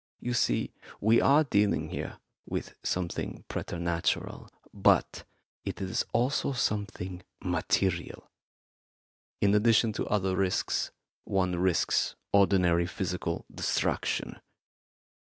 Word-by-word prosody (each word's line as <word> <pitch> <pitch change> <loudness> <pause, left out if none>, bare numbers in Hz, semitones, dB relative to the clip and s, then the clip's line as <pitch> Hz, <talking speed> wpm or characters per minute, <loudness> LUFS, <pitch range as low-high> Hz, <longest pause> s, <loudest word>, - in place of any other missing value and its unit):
You 125 - -2
see, 120 - +1 0.3
we 110 +3 +4
are 145 +3 +5
dealing 105 -7 +1
here - - -5 0.3
with - - -4
something 90 -2 -3
preternatural, 85 -1 -2 0.2
but - - +2 0.4
it - - -4
is 95 -1 -1
also 130 +3 +1
something 100 -6 -2 0.2
material; 90 -3 -1 1.1
in 100 0 +4
addition 110 +1 +4
to - - -3
other 95 -3 +1
risks, 95 -1 0 0.3
one 90 -2 0
risks 90 -1 +2 0.2
ordinary 90 -4 +4
physical 90 -2 -3
destruction. - - -1
95 Hz, 100 wpm, -29 LUFS, 90-105 Hz, 1.1 s, are